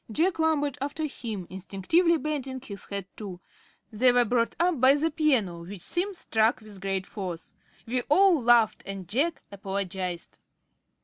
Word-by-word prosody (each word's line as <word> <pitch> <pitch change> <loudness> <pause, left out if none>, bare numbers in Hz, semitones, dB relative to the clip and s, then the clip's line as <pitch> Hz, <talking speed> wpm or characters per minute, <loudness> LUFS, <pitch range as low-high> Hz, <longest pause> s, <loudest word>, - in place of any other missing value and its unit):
Jack 330 - +1
lumbered 290 -3 +1
after 290 +3 -2
him, 225 -9 -5
instinctively 200 - +1
bending 275 -3 -3
his 200 -6 -9
head, 200 -2 -4
too. 195 -5 -7 0.5
They 245 +4 +5
were 245 0 +4
brought 235 +1 +1
up 340 -6 +2
by 265 +2 +7
the 320 +3 0
piano, 245 - +1
which 185 +1 -9
Simms 370 - -2
struck 220 -3 +1
with 210 -3 -9
great 195 -1 -1
force. 180 -6 -6 0.3
We 250 +2 0
all 360 -1 +5
laughed, 235 -2 +4
and 195 -2 -6
Jack 290 +10 0
apologised. 190 -3 -4
235 Hz, 150 wpm, -27 LUFS, 195-300 Hz, 0.5 s, by